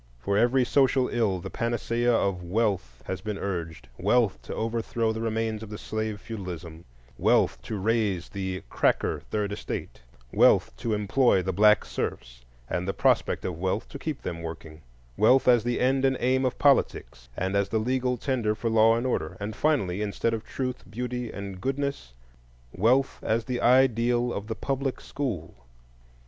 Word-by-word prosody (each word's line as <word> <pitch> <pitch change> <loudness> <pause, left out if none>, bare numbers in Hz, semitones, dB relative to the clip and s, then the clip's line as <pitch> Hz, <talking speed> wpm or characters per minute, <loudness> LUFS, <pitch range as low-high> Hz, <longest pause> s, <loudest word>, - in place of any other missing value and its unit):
For 100 +12 -2
every 120 +4 +3
social 130 -1 +3
ill 110 -6 +1
the - - -7
panacea 120 +1 0
of 100 -5 +1
Wealth 90 - -1
has 95 -1 -4
been 105 0 -4
urged,—wealth 90 - -1
to - - -7
overthrow 115 0 -1
the 110 - -4
remains 110 -1 -1
of 110 - -8
the 105 - -6
slave 110 -1 -3
feudalism; 90 -7 -7 0.3
wealth - - +3
to 110 - -5
raise 100 -3 0
the 95 -2 -4
"cracker" - - +1
Third 105 -1 -1
Estate; 105 - -5 0.3
wealth - - +4
to 110 - -1
employ 105 -1 +2
the 95 - -2
black 105 +1 +5
serfs, - - -5 0.2
and 90 +1 -2
the 95 - -2
prospect - - +1
of 85 -3 -4
wealth 95 +4 -1
to - - -8
keep 155 -4 -4
them 85 -2 -4
working; 80 -1 -8 0.4
wealth 125 +6 +4
as 120 -3 +6
the 120 0 -1
end 130 +1 +2
and 135 -1 +3
aim 130 +1 +2
of 130 - -1
politics, 70 - +1
and 95 +2 -1
as 100 -1 +1
the 110 - 0
legal 125 +2 0
tender 120 -4 0
for 115 +1 -2
law 110 0 +5
and 120 +2 -2
order; 130 - -2
and, 105 +1 -4
finally, 105 - +1
instead 105 +2 -1
of 110 -1 -3
Truth, 130 -1 -4
Beauty, 125 +1 -4
and 100 -2 -7
Goodness, 135 - -3 0.6
wealth 125 +8 +2
as 110 +1 0
the 125 -1 -2
ideal 120 -1 +3
of 100 +1 -5
the 110 - -3
Public 135 +1 -2
School. 115 - -4
110 Hz, 170 wpm, -27 LUFS, 95-125 Hz, 0.6 s, as